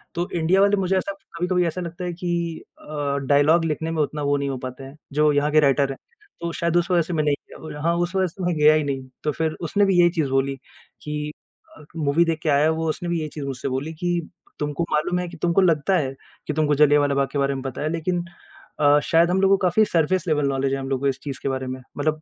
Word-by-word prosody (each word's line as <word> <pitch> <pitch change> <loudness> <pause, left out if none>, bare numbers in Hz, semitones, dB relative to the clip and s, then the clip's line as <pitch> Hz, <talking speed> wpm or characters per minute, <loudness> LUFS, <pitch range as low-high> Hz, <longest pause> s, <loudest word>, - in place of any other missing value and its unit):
,तो 175 +1 -2
इंडिया 175 +3 +3
वाले 200 0 +4
मुझे 190 0 +1
ऐसा 190 +2 -1 0.3
कभी-कभी 180 0 +1
ऐसा 180 +3 -3
लगता 170 +1 -6
है 175 - -3
कि 170 -2 -3 0.2
अ, 145 -2 -3
डायलॉग 155 +4 +4
लिख़ने 160 +1 -2
में 160 -2 0
उतना 150 +1 -4
वो 145 0 +2
नहीं 140 0 -2
हो 135 - -3
पाते 130 +1 -7
हैं। 135 +2 -11 0.2
जो 150 0 +4
यहाँ 145 +1 +1
के 155 - +5
राइटर 140 -1 +3
है, 135 - -5 0.5
तो 170 0 -2
शायद 170 0 0
उस 175 +1 0
वज़ह 175 -1 +4
से 170 +2 -4
मैं 155 -1 +1
नहीं 145 -1 +2 0.2
गया। 150 -2 -8
हाँ, 170 +1 +1
उस 175 +2 -1
वजह 190 -1 +2
से 180 +2 -8
मैं 175 -1 0
गया 150 +1 +6
ही 155 -1 +2
नहीं, 135 -2 -3 0.2
तो 150 - +1
फिर 160 +1 -1
उसने 200 +5 +2
भी 190 -3 +3
यही 175 0 +6
चीज़ 160 -5 -1
बोली 135 +1 +1 0.5
कि 150 0 -4 0.5
अ, 150 - -14
मूवी 155 +2 +2
देख 165 -1 -1
के 155 - 0
आया 145 +2 +4
वो 160 0 -1
उसने 175 +2 -3
भी 170 -1 0
यही 155 - -3
चीज़ 145 -3 -5
मुझसे 135 -1 -4
बोली 140 +5 -3
कि 175 +1 -1 0.4
तुमको 150 +3 -2
मालूम 155 +4 +1
है 180 - -3
कि 170 - -11
तुमको 175 +2 +3
लगता 170 0 +2
है 135 -4 -1 0.3
कि 150 - -1
तुमको 150 -1 +2
जलियाँवाला 145 -1 +4
बाग़ 140 -1 +2
के 145 - -3
बारे 140 0 +1
में 135 - -4
पता 135 0 -5
है 155 - -1
लेकिन 170 +2 -1 0.6
अ, 145 0 +5
शायद 170 +1 +3
हम 190 - +2
लोगों 195 0 +5
को - - -16
काफ़ी 215 +5 +3
सरफेस 180 +1 +1
लेवल 150 -3 +1
नॉलेज 135 0 0
है 135 - -1
हम 135 0 -5
लोगों 135 -1 -1
को 140 - +1
इस 135 -1 -1
चीज़ 140 -3 -5
के 135 - 0
बारे 130 0 -3
में 130 0 -5 0.2
मतलब 155 +1 -1
155 Hz, 265 wpm, -23 LUFS, 145-175 Hz, 0.6 s, गया